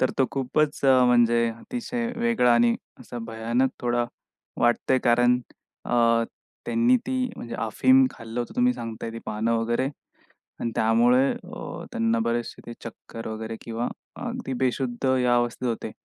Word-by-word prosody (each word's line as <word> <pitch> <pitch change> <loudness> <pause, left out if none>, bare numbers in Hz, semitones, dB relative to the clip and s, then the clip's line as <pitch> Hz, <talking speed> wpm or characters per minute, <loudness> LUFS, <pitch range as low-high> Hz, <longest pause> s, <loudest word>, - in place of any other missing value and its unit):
तर 130 - +3
तो 130 - +4
खूपच 145 +3 0
म्हणजे 120 -3 +5
अतिशय 235 - -4
वेगळा 235 - +3
आणि 120 0 +4 0.3
असा 120 -1 -8
भयानक 115 +3 0
थोडा 120 0 +1 0.6
वाटतंय 120 +2 +3
कारण 120 +1 +4 0.5
अ, 115 -1 +3 0.4
त्यांनी 240 +1 +4
ती 255 -1 0
म्हणजे 115 0 -7
अफीम 260 - +4
खाल्लं 115 +1 -6
होतं, 120 - -5
तुम्ही 250 0 +4
सांगताय 115 0 -6
ती 115 - -6
पानं 110 +2 -1
वगैरे 120 +3 0 0.7
आणि 115 - -1
त्यामुळे 120 +4 +4
अ, - - -8
त्यांना 115 0 +1
बरेचशे 120 0 -2
ते 120 - -6
चक्कर 115 0 -8
वगैरे 110 +1 -5
किंवा 115 +1 -3 0.4
अगदी 135 - -4
बेशुद्ध 130 0 -1
या 125 -1 +3
अवस्थेत 120 +1 0
होते. 115 - -3
120 Hz, 140 wpm, -25 LUFS, 115-130 Hz, 0.7 s, म्हणजे